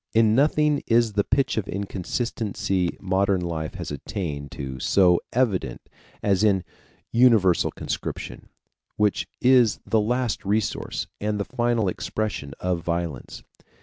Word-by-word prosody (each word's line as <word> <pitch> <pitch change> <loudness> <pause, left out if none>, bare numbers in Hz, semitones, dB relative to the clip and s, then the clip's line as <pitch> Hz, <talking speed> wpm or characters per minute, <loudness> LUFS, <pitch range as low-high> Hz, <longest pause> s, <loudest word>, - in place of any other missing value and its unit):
In 110 -1 +5
nothing 150 +3 +3
is 115 -2 +3
the 100 0 +2
pitch 135 +3 +1
of 105 -3 -1
inconsistency 100 -1 -2
modern 95 0 +1
life 80 -3 -4
has - - -5
attained 70 -1 -4
to 65 -2 -6
so 90 +4 +4
evident 100 - 0 0.4
as 100 -1 +2
in 100 -4 +3 0.5
universal 115 -8 +4
conscription, - - -5 0.5
which 105 -1 +1
is 125 -3 +5
the 110 - +2
last 120 +1 -1
resource 105 +1 -1
and 105 0 -1
the 100 - -1
final 120 -4 0
expression 95 -6 -3
of 90 -2 -1
violence. 85 -5 -4
100 Hz, 125 wpm, -24 LUFS, 90-115 Hz, 0.5 s, In